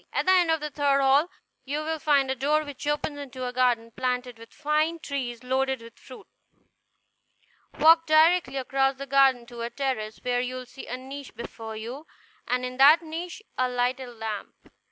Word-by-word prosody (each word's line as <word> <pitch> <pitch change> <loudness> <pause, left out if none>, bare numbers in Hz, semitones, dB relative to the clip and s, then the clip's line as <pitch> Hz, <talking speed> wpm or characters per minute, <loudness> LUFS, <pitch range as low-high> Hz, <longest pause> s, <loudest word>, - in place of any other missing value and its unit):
At - - -1
the 375 - +5
end 360 -3 +4
of 320 -1 +2
the 300 0 -4
third 280 -1 +2
hall, 275 +5 +4 0.3
you 290 +3 -3
will 320 0 -2
find 285 -4 +2
a - - -1
door 295 +4 +1
which 290 -1 -8
opens 295 0 -1
into 260 -2 -6
a 250 - -4
garden, 240 -2 +1
planted 250 -1 -3
with 230 0 -13
fine 310 +2 0
trees 255 -6 -5
loaded 265 +1 0
with 230 0 -14
fruit. 255 - -13 1.5
Walk 325 +2 +6
directly 315 -2 +4
across 270 +1 +1
the 275 +1 -7
garden 270 -3 +4
to 240 -1 -9
a 235 - -2
terrace, 240 -6 -3
where 245 0 +1
you 250 +1 -4
will 255 0 -6
see 265 +2 -11
a 250 - -4
niche 270 +1 -9
before 225 -1 -8
you, 245 +8 -7 0.4
and 250 +1 0
in 250 0 -6
that 295 +5 +7
niche 340 +5 -6 0.2
a 255 0 +2
lighted 250 +1 -1
lamp. 220 -2 -5
265 Hz, 190 wpm, -26 LUFS, 250-295 Hz, 1.5 s, that